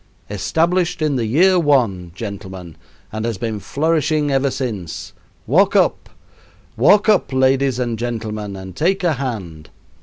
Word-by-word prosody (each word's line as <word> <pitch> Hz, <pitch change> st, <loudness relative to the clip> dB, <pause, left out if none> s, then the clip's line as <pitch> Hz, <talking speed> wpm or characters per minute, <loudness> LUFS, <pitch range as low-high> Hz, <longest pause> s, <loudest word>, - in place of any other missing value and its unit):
Established 165 Hz, -, 0 dB
in 150 Hz, -2 st, +1 dB
the 115 Hz, -3 st, -1 dB
year 180 Hz, -, +4 dB
one, 115 Hz, -, +1 dB
gentlemen, 95 Hz, -5 st, -7 dB, 0.4 s
and 110 Hz, -1 st, -3 dB
been 110 Hz, -2 st, -3 dB
flourishing 155 Hz, +5 st, 0 dB
ever 135 Hz, 0 st, +2 dB
since 110 Hz, -, -5 dB, 0.3 s
walk -, -, +3 dB
up! -, -, +2 dB, 0.7 s
Walk 200 Hz, -, +4 dB
up, 205 Hz, -10 st, +3 dB
ladies 130 Hz, 0 st, +2 dB
and 120 Hz, -3 st, -2 dB
gentlemen, 110 Hz, -4 st, -4 dB
and 95 Hz, -1 st, -9 dB
take 190 Hz, -, 0 dB
a 170 Hz, -3 st, +2 dB
hand. 100 Hz, -, -5 dB
120 Hz, 130 wpm, -19 LUFS, 100-150 Hz, 0.7 s, year